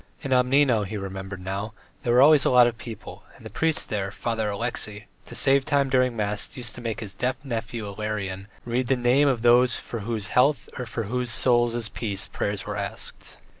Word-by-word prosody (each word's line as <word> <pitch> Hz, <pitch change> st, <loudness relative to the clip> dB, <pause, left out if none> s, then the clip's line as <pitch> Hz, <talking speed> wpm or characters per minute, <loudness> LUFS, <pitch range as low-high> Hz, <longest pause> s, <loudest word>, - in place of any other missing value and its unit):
In 135 Hz, -, -4 dB
Obnino, 125 Hz, -2 st, +4 dB
he 100 Hz, +2 st, -5 dB
remembered 95 Hz, -1 st, -6 dB
now, 100 Hz, +3 st, -4 dB, 0.3 s
there 120 Hz, -, 0 dB
were 125 Hz, -, +6 dB
always 150 Hz, -1 st, +7 dB
a -, -, +3 dB
lot 125 Hz, -1 st, +7 dB
of 120 Hz, -1 st, -2 dB
people, 115 Hz, -2 st, -9 dB
and -, -, -16 dB
the -, -, -8 dB
priest 160 Hz, -1 st, +1 dB
there, 100 Hz, -2 st, -2 dB
Father 110 Hz, +1 st, -2 dB
Alexey, 105 Hz, -1 st, -3 dB, 0.2 s
to -, -, -10 dB
save 135 Hz, 0 st, +3 dB
time 140 Hz, 0 st, +1 dB
during 125 Hz, -2 st, +2 dB
mass, 105 Hz, -1 st, -2 dB
used 120 Hz, -3 st, -3 dB
to 125 Hz, -, -9 dB
make 115 Hz, 0 st, -4 dB
his 100 Hz, -4 st, -6 dB
deaf 125 Hz, +6 st, -1 dB
nephew 115 Hz, -3 st, -4 dB
Ilarion 100 Hz, -2 st, -4 dB, 0.2 s
read 120 Hz, +1 st, -1 dB
the 135 Hz, -, +3 dB
names 125 Hz, +4 st, +3 dB
of 120 Hz, -4 st, -1 dB
those 120 Hz, 0 st, +5 dB
for 115 Hz, -, -6 dB
whose 105 Hz, -2 st, -3 dB
health 130 Hz, +1 st, +2 dB
or 125 Hz, -, -4 dB
whose 120 Hz, +2 st, -3 dB
souls' 120 Hz, -1 st, +2 dB
peace 100 Hz, -5 st, -1 dB
prayers 100 Hz, -1 st, -3 dB
were 105 Hz, 0 st, -4 dB
asked. 100 Hz, 0 st, -6 dB
115 Hz, 200 wpm, -25 LUFS, 105-125 Hz, 0.3 s, always